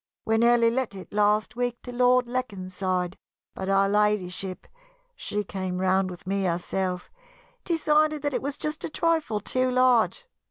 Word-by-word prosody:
We 225 0 +2
nearly 235 0 +5
let 245 -4 -2
it 190 - -10
last 210 +2 +2
week 245 0 -2
to 245 - -7
Lord 250 0 +3
Leconside, 185 -6 -3 0.4
but 190 - -5
Her 195 0 +3
Ladyship 195 -3 0 0.5
she 210 0 -3
came 185 -2 -4
round 190 0 +2
with 180 0 -10
me 195 +1 -1
herself 180 +1 -2 0.5
decided 305 -3 +2
that 290 -1 -1
it - - -1
was 280 +1 -4
just 305 0 -3
a - - -3
trifle 320 -9 0
too 255 +5 0
large. 255 - +3
210 Hz, 155 wpm, -26 LUFS, 190-255 Hz, 0.5 s, nearly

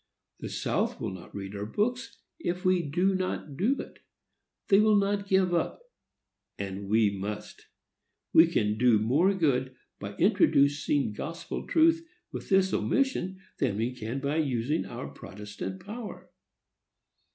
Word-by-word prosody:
"The - - -5
South - - -1
will - - -3
not 95 -2 -10
read 100 0 -6
our 100 +1 -4
books, 245 - -2 0.2
if 180 - -3
we 185 -1 +4
do 175 +6 +1
not 185 -6 -3
do 230 - +1
it. - - -8 0.7
They 195 - +7
will 215 0 +5
not 200 0 +1
give 190 -2 +3
up, 175 - -1 0.7
and 100 0 -5
we 110 -1 +4
must. 100 +2 -6 0.7
We 165 +1 +8
can 110 -10 0
do 120 -2 +5
more 135 - +3
good 130 -7 +1 0.2
by - - -6
introducing 140 -3 +3
gospel 165 +9 -5
truth 330 0 +4 0.3
with - - -7
this 190 -1 +3
omission 195 -9 0 0.2
than 120 -8 0
we 115 +3 -1
can 125 +2 -4
by 140 +3 -1
using 140 0 0
our 120 +2 -6
protestant 100 -1 -8
power." 225 0 -8
145 Hz, 140 wpm, -28 LUFS, -, 0.7 s, We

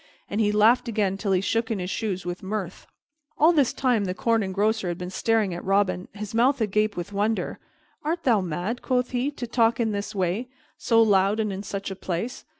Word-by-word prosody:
And 205 +2 0
he 210 -1 +3
laughed 220 +4 +4
again 205 -4 0
till 195 0 -2
he 185 -1 +3
shook 225 +3 0
in 225 - -1
his 180 0 -4
shoes 190 -5 -3
with 175 0 -4
mirth. 190 -2 -5 0.5
All 315 +3 +6
this 280 -6 +3
time 245 -6 +1
the 180 -1 -3
Corn 230 +3 +1
Engrosser 205 +1 0
had 175 -1 -2
been 180 0 -6
staring 220 -2 +1
at 175 - -6
Robin, 195 -1 +1
his 210 0 -7
mouth 250 +4 +3
agape 215 -1 0
with 175 +3 -5
wonder. 210 +3 -1 0.4
"Art 330 +3 -2
thou 230 -6 +3
mad," 180 +7 -3
quoth 250 -1 0
he, 250 +2 0
"to 280 -4 -6
talk 230 0 +2
in 225 -2 +1
this 205 0 -4
way, 190 +6 -1 0.3
so 230 -1 +3
loud 200 0 +3
and 215 -2 0
in 190 - -5
such 200 -1 -5
a - - -4
place? 190 +7 -4
210 Hz, 215 wpm, -25 LUFS, 190-230 Hz, 0.5 s, All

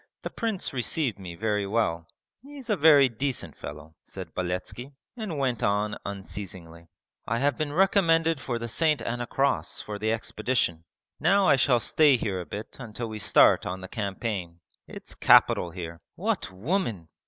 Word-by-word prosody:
The - - -4
prince 220 - -3
received 125 -2 -1
me 90 -3 -8
very 105 0 -1
well; 85 -7 0 0.3
he 285 +3 -12
is 250 -5 -5
a - - +4
very 145 -4 +7
decent 130 +2 -4
fellow,' 75 +2 -9
said - - -9
Beletski, 90 +9 -4 0.2
and 215 -10 -5
went 130 -5 0
on 105 +1 +1
unceasingly. 95 -4 -8 0.4
'I 115 - 0
have 140 +3 +1
been 155 -2 -2
recommended 165 -3 +3
for 120 -3 -2
the 115 0 -4
St. 155 +5 +1
Anna 120 +1 -3
Cross 140 +1 0
for 105 -1 -6
the 110 +1 0
expedition. 110 -6 -1 0.3
Now 200 -1 +4
I - - +6
shall 130 -2 +3
stay 145 +3 +4
here 95 -5 -2
a 90 - -9
bit 105 +2 -7
until 115 -1 -6
we 110 -1 -6
start - - +5
on 95 +1 -4
the 95 - -7
campaign. 100 -4 -4 0.3
It's - - -9
capital 90 - +5
here. 85 -1 -8
What - - -2
women! 105 - -2
115 Hz, 165 wpm, -27 LUFS, 95-145 Hz, 0.4 s, very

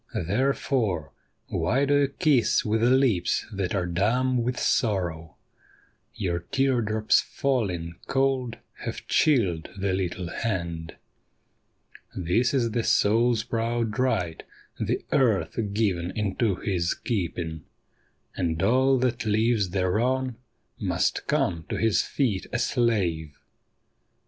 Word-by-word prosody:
Therefore, 105 - 0 0.4
why 135 +5 +1
do 140 - +2
you 145 -1 +4
kiss 140 -5 +2
with 110 +1 +1
lips 120 -7 +2
that 95 -1 -2
are 90 -3 0
dumb 120 +9 +1
with 120 +1 -2
sorrow? 85 - 0 0.8
Your 85 -3 -1
tear 130 +7 +1
drops 110 0 +2
falling 95 -12 -2
cold 135 -3 0 0.2
have - - -6
chilled 100 - +2
the 100 0 -1
httle 95 -2 -2
hand. 85 -7 -3 1.2
This 95 +8 +1
is 120 -4 +1
the 115 +1 0
soul's 115 +2 +3
proud 115 -1 -2
right, 90 -11 0 0.4
the - - -1
earth 120 -7 +2
given 100 -5 0
into 105 0 0
his 90 -2 -1
keeping; 85 - -3 0.7
And 80 -3 -1
all 130 +5 +4
that 125 -1 0
lives 110 -1 +2
thereon 115 +8 0 0.4
must - - -1
come 80 -2 0
to - - -2
his 115 -2 +2
feet 115 -9 -1
a - - 0
slave. 95 - 0
110 Hz, 115 wpm, -26 LUFS, 90-125 Hz, 1.2 s, you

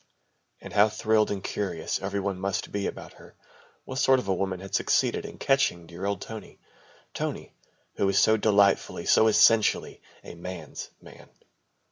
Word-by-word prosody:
And - - -10
how 105 +1 +5
thrilled 110 0 +1
and 100 -1 -4
curious 90 -6 -3
every 100 - -2
one 100 -1 -3
must 95 0 -3
be 100 -1 -2
about - - -8
her. - - -17 0.5
What 130 0 -5
sort 130 0 +4
of 125 - -4
a 95 - +2
woman 95 0 -2
had 95 0 -10
succeeded - - +1
in - - -11
catching 135 -11 +1
dear 85 +4 -6
old 100 - -2
Tony! 110 -1 -9 0.6
Tony, - - -5 0.4
who 100 - +1
was 100 0 +1
so 110 - +5
delightfully, 100 -2 +2
so 110 - +5
essentially, 110 +1 +3 0.2
a - - -10
man's 85 -3 -8
man. - - -15
100 Hz, 165 wpm, -26 LUFS, 95-110 Hz, 0.6 s, how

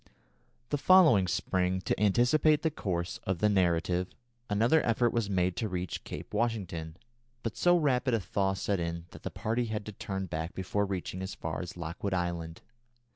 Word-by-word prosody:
The 145 - 0
following 160 - +6
spring, 90 +1 0
to - - -1
anticipate 125 +9 +3
the 160 - +2
course 90 - -3
of 95 -1 -1
the 105 +5 +3
narrative, 90 -2 +2 0.4
another 115 +10 +3
effort 120 +1 +2
was 115 -4 0
made 90 -2 +1
to 115 -3 -1
reach 90 0 -4
Cape - - -8
Washington, 95 -8 -2 0.5
but 115 - -3
so 175 0 +4
rapid 130 -5 +2
a - - +1
thaw 95 +1 0
set 95 0 -1
in 85 0 -3
that - - -12
the - - -4
party 115 +2 -1
had 110 -2 -4
to 105 - -6
turn 95 -1 -4
back 80 -1 -4
before 100 +2 -1
reaching 95 -1 -4
as 95 +1 -5
far 80 +2 -4
as 90 -1 -7
Lockwood 85 +3 -3
Island. 85 -2 -3
95 Hz, 180 wpm, -30 LUFS, 90-115 Hz, 0.5 s, following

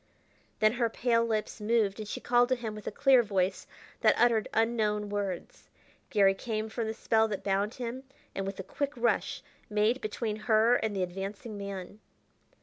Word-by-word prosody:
Then 215 0 +6
her 230 - +3
pale 230 0 +2
lips 220 -1 -2
moved, 210 -2 +1
and 215 - -5
she - - -4
called 245 0 +3
to 255 - +3
him 230 -3 -5
with 210 -1 -9
a - - -1
clear 270 -3 +5
voice 190 -3 -1 0.3
that 215 - +4
uttered 230 -2 +3
unknown 215 -2 +1
words. 200 -3 -4 0.4
Garry 195 -2 +4
came 220 +1 -3
from 225 0 -3
the 220 - -2
spell 220 -1 +2
that 205 -3 -4
bound 200 +3 0
him, 255 +2 -5 0.3
and 195 0 -3
with 195 0 -5
a - - -3
quick 285 +8 -3
rush 235 0 0 0.3
made 215 +5 +2
between 215 0 -3
her 220 +2 +4
and 215 -2 -2
the 190 - 0
advancing 195 +4 -5
man. 200 0 -7
215 Hz, 180 wpm, -30 LUFS, 200-230 Hz, 0.4 s, Then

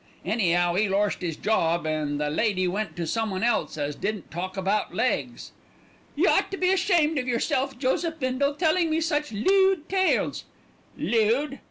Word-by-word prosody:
Any'ow 175 -4 +1
'e 205 +2 +1
lorst 200 +1 0
'is 170 -3 -3
job, 170 -6 +1
and 150 -2 -2
the 150 0 -1
lady 185 +1 +1
went 200 +3 -3
to 175 -2 -3
someone 205 +1 -2
else 235 -8 0
as 145 -1 -3
didn't 210 +2 -4
talk 185 +3 -5
about 195 +3 -1
legs." - - -2 0.6
"Y' - - +2
ought - - +3
to 390 - -5
be 365 0 +2
ashamed 345 -6 +2
of 255 - -4
yourself, 260 +2 -1
Joseph 320 +5 -1
Bindle, 270 +2 0
telling 330 +1 +2
me 315 +1 +1
such 300 -3 -1
lewd 380 - +2
tales." 380 -1 +1 0.5
"'Lewd!' 240 +6 +1
225 Hz, 165 wpm, -25 LUFS, 185-305 Hz, 0.6 s, ought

